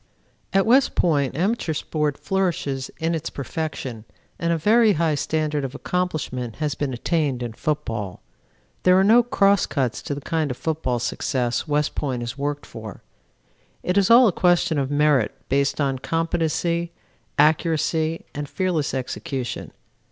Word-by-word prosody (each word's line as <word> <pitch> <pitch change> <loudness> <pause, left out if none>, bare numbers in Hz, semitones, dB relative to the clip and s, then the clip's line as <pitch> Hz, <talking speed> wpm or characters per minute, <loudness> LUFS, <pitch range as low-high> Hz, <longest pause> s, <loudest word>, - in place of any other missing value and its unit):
"At 195 -1 +3
West 250 +3 +4
Point 145 -5 +1
amateur 185 -3 0
sport 150 -1 -1
flourishes 165 -8 -1
in 165 +1 -1
its 165 0 -3
perfection, 140 -5 -5 0.4
and 170 0 0
a 165 - +2
very 215 +5 +4
high 160 -1 +1
standard 150 0 -1
of 135 0 -5
accomplishment 145 -11 -2
has 150 -2 -1
been 145 -2 -2
attained 135 0 -1
in 120 -2 -4
football. 115 -9 -3 0.6
There 185 0 +5
are - - +5
no 225 +5 +6
cross 200 -5 +3
cuts 130 -5 -1
to 145 - -4
the 145 - -7
kind 160 0 -1
of 125 - -4
football 155 -6 -1
success 120 +2 -1
West 150 0 +1
Point 130 -4 -2
has 120 0 -5
worked 145 +1 -3
for: 110 -2 -9 0.8
it 180 - 0
is 200 -2 +3
all 240 +1 +8
a - - +3
question 175 -3 +2
of 135 -1 -1
merit 145 -5 +2
based 140 +2 +1
on 135 -2 0
competency, 165 +2 -1 0.4
accuracy 160 +1 +2
and 145 0 -5
fearless 180 -8 -1
execution. 130 0 -4
150 Hz, 150 wpm, -23 LUFS, 135-170 Hz, 0.8 s, all